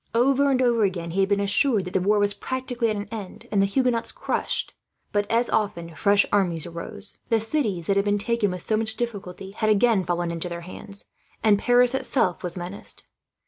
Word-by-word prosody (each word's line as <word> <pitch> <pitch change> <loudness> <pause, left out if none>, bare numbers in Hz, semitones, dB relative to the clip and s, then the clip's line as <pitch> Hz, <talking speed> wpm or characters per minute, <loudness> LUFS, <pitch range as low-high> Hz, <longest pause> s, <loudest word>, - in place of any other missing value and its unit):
Over 275 +4 +3
and 260 -1 +2
over 235 -3 +3
again, 175 -4 -1
he 190 - -2
had 195 0 +2
been 200 -1 +2
assured 200 +1 +2
that 180 - -7
the 190 - +2
war 210 +3 +3
was 205 0 +2
practically 255 -2 -2
at 215 - -1
an 205 +1 -5
end, 210 -5 -7
and 200 - +3
the 195 - +3
Huguenots 240 +2 0
crushed; - - -1 0.4
but 205 -1 0
as 235 +1 +2
often, 170 -6 -1
fresh 200 +5 +3
armies 175 -6 +1
rose. 170 +4 -8
The 225 - +3
cities 220 - -1
that 200 +2 +1
had 200 - +2
been 205 0 +2
taken 220 0 +1
with 180 -1 -5
so 215 - +1
much 220 0 +1
difficulty 195 -5 -5
had 215 +1 -1
again 215 -1 +3
fallen 175 0 -1
into 170 +1 -3
their 170 0 -5
hands, 195 +3 -10 0.4
and 210 -2 +4
Paris 245 +1 +4
itself 255 -8 0
was 180 0 -3
menaced. 180 +3 -6
205 Hz, 210 wpm, -24 LUFS, 185-230 Hz, 0.4 s, and